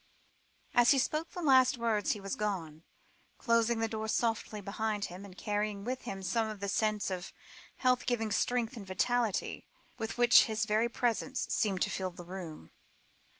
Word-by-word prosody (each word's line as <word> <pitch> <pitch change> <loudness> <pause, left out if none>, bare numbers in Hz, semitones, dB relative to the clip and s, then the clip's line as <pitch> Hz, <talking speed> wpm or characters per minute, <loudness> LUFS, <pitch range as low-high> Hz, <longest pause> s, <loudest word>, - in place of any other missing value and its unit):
As 240 0 +5
he 280 - +6
spoke 305 +5 0
the 355 - -6
last 260 -3 +5
words 225 -3 +1
he 210 - -7
was 195 0 -4
gone, 175 -7 -3 0.6
closing 230 -1 +2
the 225 - +2
door 220 0 -4
softly 220 -1 -1
behind 210 +1 -2
him, 185 +2 -9
and 195 -2 -12
carrying 210 -1 -2
with 255 +3 -4
him 195 -1 -5
some 220 +5 0
of 215 -2 -7
the 200 - -3
sense 210 -1 0
of 180 -1 -4 0.4
health 250 -1 +1
giving 225 -3 0
strength 245 +3 0
and 205 -4 -9
vitality, 230 +3 0 0.3
with 225 +1 -4
which 240 0 +7
his 220 0 -1
very 220 +2 +2
presence 245 +2 -1
seemed 195 -4 +1
to - - -1
fill 185 -1 -2
the 175 -1 -11
room. 170 - -8
220 Hz, 175 wpm, -32 LUFS, 200-240 Hz, 0.6 s, which